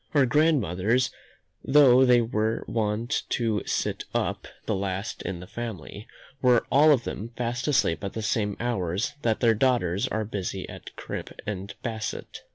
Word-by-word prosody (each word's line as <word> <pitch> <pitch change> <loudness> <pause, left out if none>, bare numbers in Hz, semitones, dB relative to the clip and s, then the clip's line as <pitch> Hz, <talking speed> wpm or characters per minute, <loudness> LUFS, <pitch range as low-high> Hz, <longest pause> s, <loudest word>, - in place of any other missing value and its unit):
Our 140 -2 +6
grandmothers, 125 - +2 0.5
though 130 -2 +6
they 125 -1 +5
were 110 -1 -1
wont 110 +4 -1
to 110 -4 0
sit - - -1
up - - -1 0.2
the - - 0
last 95 +1 -3
in 90 -3 -5
the - - -8
family, 105 -2 -7 0.3
were 125 -2 +4
all 150 +3 +6
of 130 -5 +3
them 110 +4 -5
fast 125 +2 -2
asleep 100 - +2
at 100 - -4
the 110 - -4
same 105 -1 0
hours 100 - -1
that 115 -4 0
their 115 -2 +5
daughters 105 -6 +1
are 110 0 -2
busy 95 -2 -4
at - - -10
crimp - - -6
and 100 -1 -5
basset. 110 -2 -5
110 Hz, 160 wpm, -26 LUFS, 100-125 Hz, 0.5 s, Our